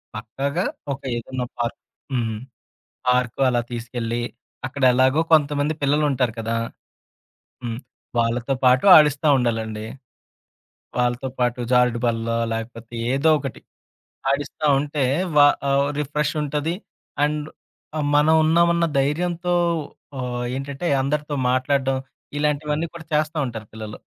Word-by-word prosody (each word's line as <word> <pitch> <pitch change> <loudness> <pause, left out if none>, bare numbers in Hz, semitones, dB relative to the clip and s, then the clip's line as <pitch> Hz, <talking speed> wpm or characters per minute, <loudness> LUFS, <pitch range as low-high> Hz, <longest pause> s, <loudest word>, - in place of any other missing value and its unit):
పక్కాగా 135 +6 -2 0.3
ఒక 135 - -9
ఏదన్నా 125 +2 -4
పార్క్ 120 +4 -2 0.4
హ్మ్. 110 -3 -1 0.7
పార్క్ 125 0 +2
అలా 120 -1 +1
తీసుకెళ్ళి, 120 0 -3 0.5
అక్కడ 135 +1 -5
ఎలాగో 130 +5 +4
కొంతమంది 145 0 +3
పిల్లలుంటారు 140 -4 +2
కదా! 115 +1 -1 1.1
హ్మ్. 115 0 -3 0.4
వాళ్ళతో 120 +3 0
పాటు 125 +6 +5
ఆడిస్తా 150 0 +4
ఉండాలండి. 110 -3 -1 1.1
వాళ్ళతో 125 +2 0
పాటు 125 0 +1
జారుడు 125 -1 +3
బల్లో 115 0 0 0.2
లేకపోతే 115 +1 -7 0.2
ఏదోకటి. 140 -1 +1 0.7
ఆడిస్తా 145 +2 -2
ఉంటే, 145 0 -1 0.3
వా 145 - +9 0.2
ఆహ్, 140 +1 +3
రిఫ్రెష్ 150 +1 -1
ఉంటది. 150 +3 -1 0.5
అండ్ 150 0 -2 0.5
ఆ! - - 0 0.2
మనం 150 +2 +5
ఉన్నామ 170 +2 +4
ఉన్న 170 0 +2
ధైర్యంతో 175 +5 0 0.6
ఆహ్, 125 -1 -3
ఏంటంటే, 140 +5 -4
అందరితో 150 +1 -1 0.2
మాట్లాడడం, 135 +1 +1 0.4
ఇలాంటివన్నీ 150 +2 0
కూడా 160 -1 -9
చేస్తా 155 +1 +1
ఉంటారు 110 -3 -6
పిల్లలు. 110 -1 -7
135 Hz, 110 wpm, -23 LUFS, 120-150 Hz, 1.1 s, వా